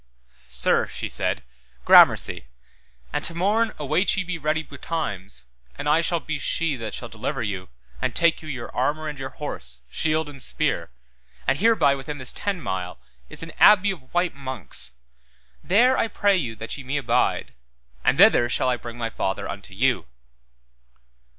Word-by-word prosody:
Sir, - - +2
she - - -5
said, 65 - -2 0.4
gramercy, - - +6 0.7
and - - -1
to 165 - -1
morn 215 +6 +2
await 165 +8 +1
ye 195 - +1
be 180 -2 -4
ready 155 +1 0
betimes 130 - -5 0.3
and - - -4
I 155 +3 +4
shall 170 0 +1
be 155 -1 -4
she 165 -1 0
that 110 -3 -5
shall - - -6
deliver - - -4
you 95 -3 -4 0.3
and - - -1
take 170 -1 +3
you 155 - -9
your 130 -4 -6
armour 150 +5 0
and 150 -2 -6
your 135 0 -4
horse, 65 - -6
shield 155 - 0
and 140 -2 -8
spear, - - -1 0.6
and 135 +2 +1
hereby 195 -10 +4
within 140 +2 -5
this 130 -2 -2
ten 200 -3 -2
mile, 95 - -4 0.3
is - - -5
an 165 - -7
abbey 205 -1 +7
of 145 -9 -10
white 175 0 +1
monks, 130 -1 -4 0.7
there 245 +7 +4
I - - +2
pray 205 -2 +2
you 125 -11 -2
that 115 +1 -6
ye - - -8
me 135 +3 -2
abide, 120 - 0 0.5
and - - +3
thither 120 - +6
shall 130 - +1
I 125 - +1
bring 120 0 -9
my 115 -1 -3
father 95 - -2
unto - - -8
you. - - +1
145 Hz, 170 wpm, -24 LUFS, 120-170 Hz, 0.7 s, abbey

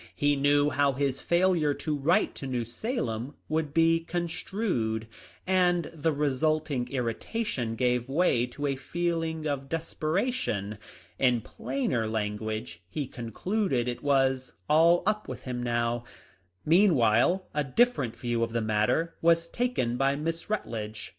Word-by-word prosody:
He 145 0 +2
knew 145 +1 +3
how 140 0 +2
his 135 0 -1
failure 170 -4 +2
to 155 -2 -2
write 145 +5 +2
to 135 - -6
New 125 -2 -1
Salem 125 - -3
would 155 -1 -1
be 165 +1 +4
construed, 165 - -2 0.4
and 180 -2 +2
the 160 0 0
resulting 150 -2 0
irritation 125 - -2
gave 125 +1 0
way 135 -5 +2
to 145 +4 -5
a 140 -1 0
feeling 165 +2 -2
of 140 -2 -2
desperation. 155 - -2 0.4
In 125 -3 +3
plainer 125 -1 -2
language, 110 -4 -3
he 145 +7 -3
concluded 130 - -2
it 120 - -3
was 135 -2 +1
" 90 - -42
all 165 +3 +5
up 210 +1 0
with - - -7
him 125 -1 -4
now." 120 0 0 0.6
Meanwhile 165 - +4
a 150 - +1
different 140 - +2
view 120 0 -1
of 115 0 -1
the 120 - +1
mat 110 -1 +1
ter 165 +1 0
was 165 0 +3
taken 200 - -1
by 135 +1 +2
Miss 165 +4 -3
Rutledge. 110 - -4
140 Hz, 140 wpm, -28 LUFS, 120-165 Hz, 0.6 s, all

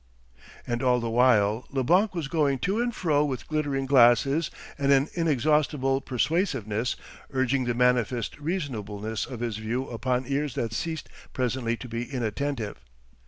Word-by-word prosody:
And 120 0 -2
all 125 -1 +3
the 115 -1 -3
while 115 -2 +3
Leblanc 180 - +2
was 165 -5 -2
going 145 -3 +1
to 200 +5 +1
and 240 0 0
fro 155 -9 +1
with 135 -4 -3
glittering 145 -3 -1
glasses 135 +4 +4 0.3
and 140 -1 +1
an 140 +2 +4
inexhaustible 150 -3 +1
persuasiveness, 125 - 0 0.3
urging 130 0 +1
the 120 -1 -1
manifest 125 0 +1
reasonableness 110 - -3
of 125 -3 -7
his 115 -3 -2
view 115 +5 -2
upon 125 +2 -1
ears 140 0 -1
that 115 -2 -2
ceased 160 +4 -3 0.3
presently 120 -2 -1
to 125 - -8
be 115 0 -3
inattentive. 120 -1 -3
130 Hz, 145 wpm, -27 LUFS, 120-145 Hz, 0.3 s, glasses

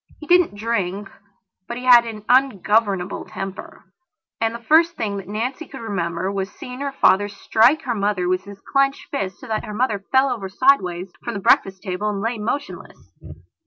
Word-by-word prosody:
He 305 - -9
didn't 350 - +4
drink, 205 -3 -2 0.6
but 235 - -5
he 250 - -7
had 240 -2 +7
an 215 -2 -8
ungovernable 210 -6 +2
temper, 195 0 -8 0.6
and 225 0 0
the 235 - -9
first 330 +6 +4
thing 210 -7 -3
that 195 - -8
Nancy 245 +9 -4
could 270 - -10
remember 185 -4 -2
was 195 -1 -3
seeing 250 +4 -9
her 280 0 -3
father 205 -6 +3
strike 225 +7 +2
her 245 - -1
mother 200 -4 -1
with 185 +1 0
his 200 -1 -11
clenched 275 0 0
fist 195 -9 -3
so - - -12
that 220 -1 -2
her 210 - -7
mother 215 -4 0
fell 265 +1 +4
over 195 -5 -4
sideways 185 -7 +2
from - - -4
the - - -3
breakfast 190 -1 +2
table 200 +1 -2
and 205 -1 -3
lay 230 +2 -2
motionless. 260 +7 -6
215 Hz, 185 wpm, -21 LUFS, 195-255 Hz, 0.6 s, had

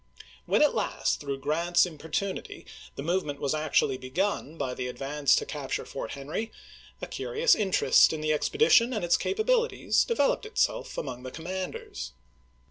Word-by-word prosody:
When - - +4
at 300 - +4
last, 215 - -1
through 140 -2 -5
Grant's 170 +5 +2
importunity, 165 +4 -4 0.3
the 140 - -5
movement 155 -4 -1
was 140 0 0
actually 150 -4 +1
begun 160 +3 -2
by 130 -4 -2
the 125 0 -4
advance 140 +3 +1
to - - -1
capture 145 -3 -4
Fort 135 - -6
Henry, 150 +11 -4 0.5
a - - 0
cm'ious - - +2
interest 195 -4 +4
in 160 - -3
the 155 0 0
expe 150 - -1
dition 250 - +5
and 210 - -1
its 170 - +4
capabilities 460 +3 +1
developed 435 - +1
itself 440 - -1
among 125 -3 -4
the 130 - -7
commanders. 180 - -6
160 Hz, 155 wpm, -28 LUFS, 140-205 Hz, 0.5 s, dition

